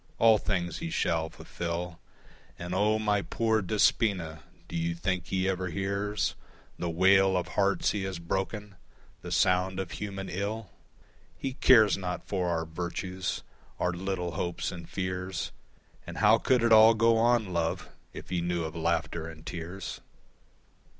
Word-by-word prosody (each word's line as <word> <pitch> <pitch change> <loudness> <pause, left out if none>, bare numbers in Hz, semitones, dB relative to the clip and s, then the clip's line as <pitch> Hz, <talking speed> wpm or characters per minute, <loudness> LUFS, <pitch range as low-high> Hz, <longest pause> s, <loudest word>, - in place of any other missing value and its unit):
All 110 -2 +6
things 90 -4 -2
he 170 - -4
shall 80 - 0
fulfill, 85 +1 -5 0.6
And 90 +1 -5
O, 105 +3 +3
my 105 -2 +1
poor 110 +1 +1
Despoina, 95 -4 +1 0.3
do - - -7
you 85 0 -1
think 90 0 -2
he 95 0 0
ever 95 -1 -1
hears 100 +3 -1 0.5
The 85 - -1
wail 95 +2 +4
of 90 - -2
hearts 100 -1 +2
he 105 - -2
has 95 -2 -4
broken, 95 +3 -3 0.4
the - - -7
sound 95 0 +2
of 95 - -4
human 95 -2 -5
ill? 100 +2 -4 0.7
He 135 - -3
cares 110 -6 +5
not 90 -1 -4
for 90 -3 -1
our 80 -1 -1
virtues, 90 +3 -4 0.4
our 90 - +1
little 90 -1 -3
hopes 85 +2 -2
and 85 -2 -9
fears, 95 -1 -3 0.6
And - - -7
how 110 +1 +5
could 125 -3 +2
it 115 -1 +5
all 110 +1 +8
go 115 +1 +4
on, 115 -4 +2
love, 85 -1 -1 0.2
if - - -10
he 90 -1 -1
knew 85 -1 -1
of 80 +1 -5
laughter 85 0 -1
and 80 -1 -11
tears? 90 +3 -6
95 Hz, 155 wpm, -29 LUFS, 85-105 Hz, 0.7 s, all